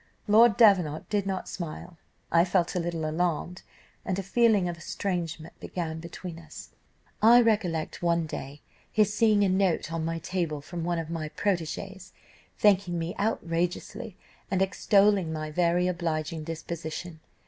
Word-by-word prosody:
Lord 220 +1 +6
Davenant 180 -9 +4
did 205 -2 0
not 190 -1 -3
smile. 170 0 -7 0.4
I 170 0 +5
felt 180 -1 +1
a 180 - 0
little 170 -2 -2
alarmed, 175 +2 -1 0.4
and 185 - -2
a 195 - -2
feeling 210 -2 +3
of 175 - -3
estrangement 170 -4 -4
began 160 -3 -4
between 170 0 -8
us. 155 -2 -11 0.5
"I 235 +3 +8
recollect 205 -9 0
one 170 -1 +1
day 145 -1 -7 0.3
his 210 -1 +2
seeing 210 -1 +4
a - - +3
note 185 -3 +1
on 165 -1 -2
my 165 +1 -2
table 165 -3 -2
from 170 +4 -6
one 175 0 -1
of 165 -1 -4
my 160 -2 -3
protegés, 190 +2 -3 0.4
thanking 195 -4 +3
me 165 +1 -3
outrageously, 195 +2 -2 0.3
and 190 - 0
extolling 195 -2 +3
my 155 -1 -4
very 175 +2 +2
obliging 165 -3 -2
disposition. 165 0 -6
175 Hz, 150 wpm, -27 LUFS, 165-195 Hz, 0.5 s, I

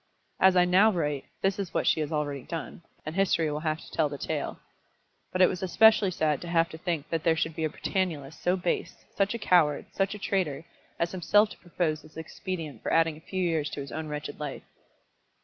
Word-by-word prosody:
As 190 0 +6
I 180 -1 +6
now 190 +5 +5
write, 150 -7 -1 0.2
this 195 +1 +1
is 185 -4 -4
what - - +1
she - - +3
has 155 0 -2
already 145 -3 -2
done, 165 +5 -6 0.2
and 155 - -4
history 175 -4 +2
will 150 - -2
have 155 0 -1
to - - -13
tell 155 -2 +1
the 145 - -6
story. - - -3 0.8
But 185 0 +3
it - - +8
was 180 - -3
especially 205 +2 +5
sad 155 -5 0
to 175 - -7
have 170 -1 +2
to 160 - -9
think 165 -4 -3
that 165 -1 -1
there 165 -1 +3
should 160 -1 -1
be 160 -1 -1
a - - 0
Britannulist 160 -5 -3
so 180 +1 +2
base, 180 -2 -3
such 200 +3 +1
a - - -1
coward, 170 -9 +3
such 195 +1 0
a - - -6
traitor, 180 -7 -1 0.3
as 170 0 0
himself 205 +4 +3
to - - -10
propose 165 -3 -2
this 155 0 -16
expedient 160 -1 -6
for - - -3
adding 165 -1 +3
a - - -13
few 185 +2 -3
years 160 -4 0
to 145 - -6
his 140 -1 -6
own 160 0 -4
wretched 150 -1 -5
life. 145 -2 -5
165 Hz, 225 wpm, -28 LUFS, 155-185 Hz, 0.8 s, it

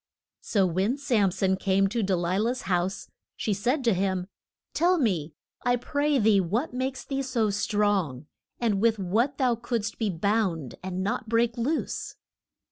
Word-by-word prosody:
So 200 -3 +2
when 190 +9 0
Sam 235 -9 +2
son 190 +1 0
came 195 0 +2
to 235 +3 -1
De 190 -2 +1
li 175 +2 0
lah's 240 +4 -1
house 185 +1 -1 0.3
she 215 - 0
said 250 +8 0
to 230 -3 +3
him, 185 -1 0 0.5
Tell 355 +3 +3
me, 180 - 0 0.3
I 245 0 +3
pray 285 +4 0
thee 215 -4 +4
what 225 - -1
makes 260 +1 -3
thee 275 -1 -2
so 240 -5 0
strong, 200 - 0 0.3
and 215 -5 +1
with 225 -1 +3
what 220 +9 0
thou 255 -3 +3
couldst 230 -2 -3
be 220 -3 +1
bound 180 - 0
and 185 0 -3
not 225 +2 -2
break 230 0 +2
loose? 270 +7 -2
215 Hz, 165 wpm, -27 LUFS, 190-245 Hz, 0.5 s, thee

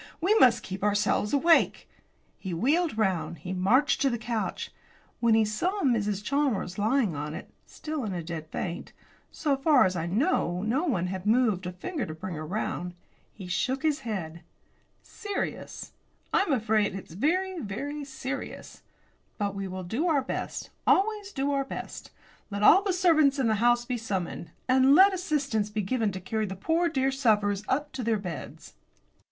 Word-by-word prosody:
We 375 +6 +3
must 240 -2 +5
keep 190 0 -6
ourselves 210 0 +1
awake." 320 +4 +3 0.5
He 185 -3 -4
wheeled 295 - +1
round; 190 -5 0
he 180 +5 -6
marched 225 +11 +2
to 275 - +4
the 240 - -1
couch. 230 -1 -3 0.5
When 230 -2 +4
he 220 -1 +4
saw 360 - -1
Mrs. 210 -6 +1
Chalmers 245 -9 -1
lying 220 - +1
on 150 +2 -4
it, - - -9 0.2
still 305 -3 -5
in 210 - -3
a 175 -2 -4
dead 160 -1 -6
faint 170 +2 -5 0.4
so 290 -3 0
far 275 -2 +4
as 185 0 0
I 165 -1 -2
know 195 - 0
no 255 +10 0
one 195 - 0
had 185 +2 -4
moved 215 -6 +2
a - - -3
finger 280 - -4
to 155 - -6
bring 185 +3 -6
her 155 -1 -5
round 180 -2 -3 0.4
he 195 - -10
shook 260 - -1
his 305 -2 +1
head. 180 -10 -5 0.6
"Serious; 410 -3 -5 0.4
I - - +4
am 385 - -1
afraid 215 -5 +1
it's 190 -4 -8
very, 360 - 0
very 285 +7 -5
serious. 270 0 -6 0.6
But 200 -2 -1
we 195 -1 -4
will 185 0 -6
do 230 - -1
our 295 -5 +2
best; - - -5 0.2
always 410 0 +2
do 275 -4 -1
our 275 -1 +1
best. 270 - -7 0.4
Let 200 0 -3
all 375 - +8
the 400 -1 0
servants 320 -6 +4
in 265 - +1
the 220 - +2
house 240 0 +3
be 250 0 -2
summoned, 190 -6 -4 0.2
and 260 +2 +5
let 385 +3 +7
assistance 280 - -1
be 210 0 -2
given 220 +1 0
to 185 - -5
carry 215 +3 -2
the 190 - -5
poor 330 - +1
dear 270 -3 +1
sufferers 210 -6 +1
up 290 +2 -1
to 265 - -5
their 225 -1 +1
beds." 180 -6 -8
230 Hz, 180 wpm, -27 LUFS, 190-285 Hz, 0.6 s, all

